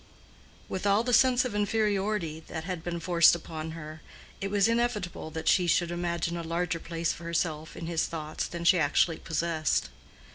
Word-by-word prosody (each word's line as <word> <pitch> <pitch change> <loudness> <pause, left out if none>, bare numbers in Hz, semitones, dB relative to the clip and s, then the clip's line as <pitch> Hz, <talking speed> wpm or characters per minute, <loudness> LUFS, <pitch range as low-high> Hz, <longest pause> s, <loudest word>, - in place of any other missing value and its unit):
With 190 +2 -3
all 200 +3 +4
the 245 0 -1
sense 255 +1 +5
of 250 - -3
inferiority 205 -5 0
that 160 - -5
had 180 -2 -5
been 175 -1 -3
forced 170 0 +5
upon 160 -1 -6
her, 155 0 -9 0.4
it 195 - -2
was 200 0 +3
inevitable 230 -8 -1
that 160 0 -6
she 180 -1 +4
should 175 0 +2
imagine 170 -1 -2
a 170 - -3
larger 170 +1 -2
place 165 0 -2
for - - -11
herself 160 -2 -2
in 165 - -5
his 165 -1 0
thoughts 155 -2 -4
than 170 0 -6
she 175 +1 +5
actually 155 +2 +2
possessed. 160 - -1
170 Hz, 180 wpm, -28 LUFS, 160-200 Hz, 0.4 s, sense